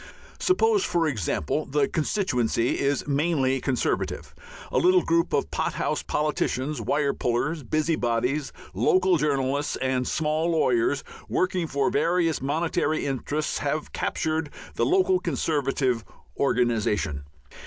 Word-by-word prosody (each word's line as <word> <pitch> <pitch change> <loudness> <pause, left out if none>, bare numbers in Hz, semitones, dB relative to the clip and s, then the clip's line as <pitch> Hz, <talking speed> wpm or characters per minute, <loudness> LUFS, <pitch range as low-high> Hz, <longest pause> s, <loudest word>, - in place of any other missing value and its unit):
Suppose, 410 +2 +3
for 170 -2 +1
example, 110 - -1
the 140 0 +1
constituency 130 - 0
is 140 0 0
mainly 140 -3 +1
Conservative. 130 -3 -2 0.4
A - - +2
little 365 +1 +4
group 335 0 +1
of - - 0
pothouse - - -1
politicians, 150 -2 -1
wire 140 +5 +1
pullers, 135 +7 -1
busybodies, 135 -2 0 0.2
local 185 -1 +3
journalists, 140 -1 0
and 130 -1 -1
small 155 +2 0
lawyers, 140 -4 +2 0.3
working 180 -2 0
for 140 +5 0
various 175 -5 +1
monetary 155 +2 0
interests, 145 +3 -2
have 145 +2 -2
"captured" 160 -1 -1 0.2
the - - 0
local 375 +1 +3
Conservative 135 - 0 0.3
organization. 110 - 0
145 Hz, 110 wpm, -25 LUFS, 130-165 Hz, 0.4 s, little